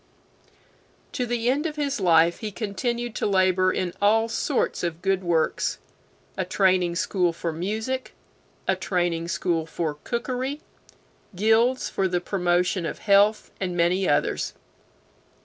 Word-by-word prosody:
B. - - -35 0.6
To 250 - -2
the 235 0 -1
end 295 +5 0
of 305 - -6
his 280 -4 -1
life 170 -2 +4
he 215 -2 -4
continued 235 +3 -3
to - - 0
labor 185 -1 +3
in 180 -2 -2
all 220 +2 +4
sorts 255 +3 -1
of 170 -1 -4
good 195 -1 +1
works 165 -2 0 0.6
a - - -1
Training 185 -2 +2
School 180 -1 +1
for 165 0 -4
Music, 220 +10 -3 0.5
a - - +3
Training 175 -2 -1
School 170 -2 -1
for 155 -3 -3
Cookery, 255 +4 -3 0.8
guilds 225 +6 +3
for 195 - 0
the 180 -1 0
promotion 180 0 0
of - - -5
health, 205 +1 +3
and 180 -2 -2
many 180 +2 +2
others. 145 - 0
190 Hz, 140 wpm, -25 LUFS, 175-225 Hz, 0.8 s, life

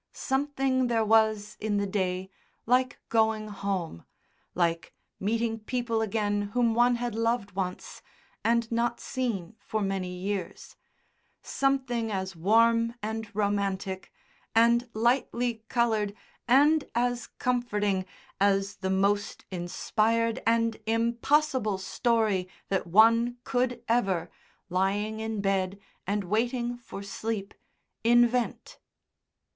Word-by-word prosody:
Something 265 -2 0
there 225 -2 +1
was 215 -1 +3
in 210 -1 -1
the 200 - +1
day 190 -1 -2 0.3
like 250 +2 +2
going 220 -1 +2
home, 195 - -3 0.5
like 170 -1 0 0.2
meeting 225 +2 -1
people 230 0 -1
again 205 -1 0
whom 240 -2 +3
one 240 +1 +4
had 240 -1 -3
loved 230 -2 0
once, 185 -1 -5 0.4
and 230 0 +1
not 235 +1 0
seen 225 -8 -3
for 215 -1 -3
many 190 -2 -2
years, 195 +1 -4 0.7
something 260 -5 0
as 190 -1 -3
warm 230 +6 +3
and 220 0 -3
romantic 200 -2 -1 0.4
and 235 +1 +4
lightly 235 -1 0
coloured 220 -4 +1 0.3
and 290 +5 +4
as 245 0 0
comforting 210 -6 0 0.4
as 195 0 +2
the 190 - -3
most 200 +2 0
inspired 220 +6 0
and 230 0 +2
impossible 235 0 +1
story 210 -1 0 0.2
that 190 -2 0
one 230 +6 +5
could 245 -2 -1
ever, 195 -8 +1 0.4
lying 200 +4 0
in 220 -2 -3
bed 195 0 0 0.3
and 205 +1 0
waiting 240 +5 0
for 200 -4 -8
sleep, 200 0 -4 0.5
invent. 240 +1 +2
220 Hz, 110 wpm, -28 LUFS, 200-235 Hz, 0.7 s, one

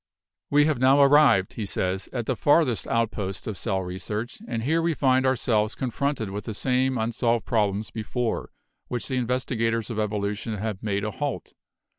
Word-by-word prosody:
"We 145 +1 +5
have 150 -5 +1
now 135 +2 +5
arrived," 140 -9 +5
he 110 - -4
says, 95 0 -2
"at 120 -3 -3
the 130 - 0
farthest 145 -3 +2
outposts 105 -4 -1
of 110 - -4
cell 95 -2 -2
research, 105 +6 -5
and 115 -1 -3
here 160 +6 +2
we 165 -1 0
find 130 -1 +3
ourselves 110 -4 +1
confronted 130 -4 -2
with 100 +1 -5
the 110 - -4
same 130 +2 +1
unsolved 115 0 0
problems 105 -2 0
before 115 +1 -3 0.4
which 120 -2 -3
the 130 - -2
investigators 115 -2 -1
of 110 - -3
evolution 105 +1 -2
have 105 -1 -4
made 100 -1 -1
a 105 - -2
halt. 145 +2 -4
115 Hz, 170 wpm, -25 LUFS, 105-130 Hz, 0.4 s, We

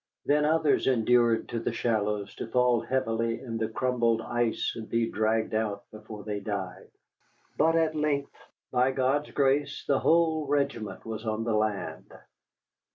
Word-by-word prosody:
Then 150 +1 +3
others 155 -1 +2
endured 120 -2 +3
to 115 - -2
the 115 - -2
shallows 105 -3 -1
to - - -5
fall 125 -1 +2
heavily 115 -3 -1
in 115 -3 -5
the 110 - 0
crumbled 115 -1 +1
ice 120 0 -1
and 110 -1 -7
be 115 0 +1
dragged 110 0 0
out 105 -2 -1
before 110 -1 -10
they 105 -1 -3
died. 95 -2 -5 0.7
But 165 +1 +3
at 160 -1 +2
length, 150 -2 -1 0.4
by 130 +1 +2
God's 135 +3 +1
grace, 140 0 0
the 140 - +3
whole 160 -2 +2
regiment 140 -7 -2
was 110 0 -5
on 110 0 -2
the 115 -1 -1
land. 105 -2 -2
115 Hz, 155 wpm, -28 LUFS, 110-140 Hz, 0.7 s, Then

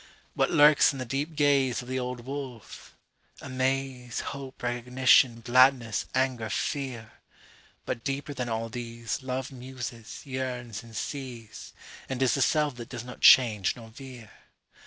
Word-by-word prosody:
…What - - +1
lurks 150 0 +6
in 140 - -7
the 130 - -4
deep 140 +6 -3
gazeOf 135 -4 +2
the 130 +1 -2
old 125 -1 -5
wolf? 130 -7 -8 0.4
Amaze, 130 -2 -2
Hope, 135 -2 -9
recognition, 120 0 +3
gladness, 125 -2 +3
anger, 130 -4 0
fear. 125 +1 -3 0.7
But 115 - -4
deeper 140 +1 -3
than 125 -3 -3
all 115 0 -2
theseLove 120 +3 -4
muses, 125 -3 -8
yearns, 125 -4 -4
and 115 -1 -14
sees, 120 -7 -6 0.4
And 130 -2 -3
is 130 - +3
the 140 - 0
self 150 0 +2
that 120 - -8
does 120 -2 -6
not 125 0 -10
change 110 -7 +6
nor 115 -2 -12
veer. 125 -2 -11
125 Hz, 135 wpm, -28 LUFS, 115-135 Hz, 0.7 s, lurks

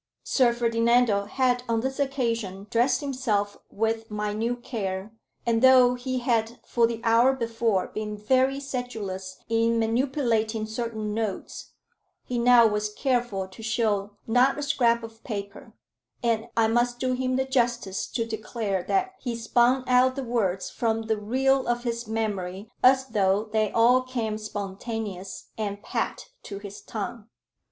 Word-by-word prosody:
Sir 250 -3 +3
Ferdinando 230 -2 +2
had 250 +3 +1
on 225 -1 +1
this 265 +2 -3
occasion 230 -8 -1
dressed 250 +3 +2
himself 235 -8 -1
with 225 +1 -1
minute 215 +3 -2
care; 195 -2 -4 0.3
and 230 -1 +2
though 255 -1 +7
he 255 +1 -3
had 235 -2 0
for 235 -1 +3
the 230 -1 -5
hour 230 +3 +5
before 230 -6 0
been 210 -1 -5
very 260 +5 +2
sedulous 220 -9 -5
in 230 0 +2
manipulating 230 -2 0
certain 220 -1 -4
notes, 215 -3 -4 0.5
he 245 -1 -3
now 240 -1 +7
was 210 -1 0
careful 240 -6 -1
to 190 - -12
show 215 -3 0
not 250 +4 +3
a 290 - -3
scrap 235 -5 +2
of 225 0 -11
paper; 200 -3 -6 0.5
and 230 -1 +1
I 225 - +5
must 240 +1 +1
do 255 0 0
him 255 0 -1
the 265 +1 +1
justice 240 -7 0
to 230 - -2
declare 220 -3 -3
that 375 - 0
he 240 -3 -3
spun 240 +3 +2
out 255 +1 +4
the 275 - -3
words 205 -7 -1
from 225 -1 -1
the 220 -1 0
reel 265 +5 +1
of 240 0 0
his 235 -1 -3
memory 205 -3 -3
as 265 +1 +5
though 205 -4 +1
they 215 -1 +1
all 245 +3 +5
came 235 -4 -3
spontaneous 205 -1 -6
and 205 -1 -3
pat - - -3
to 200 - -7
his 200 0 -9
tongue. 215 +1 -6
230 Hz, 150 wpm, -26 LUFS, 210-250 Hz, 0.5 s, though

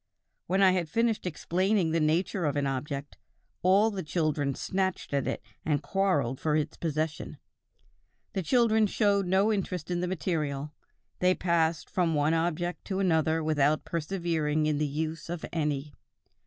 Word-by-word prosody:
When 190 +3 +3
I 190 - +7
had 180 -4 -1
finished 225 +1 0
explaining 180 +2 0
the 165 - +2
nature 170 +4 +1
of 145 -1 0
an 145 -1 0
object, 140 +1 -4 0.4
all 195 +5 +4
the 195 -2 -4
children 155 -4 -1
snatched 190 -5 -2
at 140 -2 0
it - - -3 0.2
and 150 -1 0
quarreled 145 -7 0
for 155 -1 +1
its 155 0 -1
possession. 155 -1 -3 1.0
The 195 - -1
children 220 +1 +3
showed 200 -2 +2
no 195 +4 +3
interest 180 -4 -3
in 175 - 0
the 180 - -1
material: 150 -5 -2 0.5
they 180 0 +3
passed 165 -3 +1
from 170 -3 0
one 150 +2 +2
object 175 +1 -1
to 190 - -3
another 160 -3 +2
without 155 -1 +2
persevering 160 -3 -1
in 150 -1 +1
the 150 - +1
use 155 +3 -4
of 175 -1 -4
any.... 150 -3 -2
165 Hz, 155 wpm, -28 LUFS, 150-185 Hz, 1.0 s, I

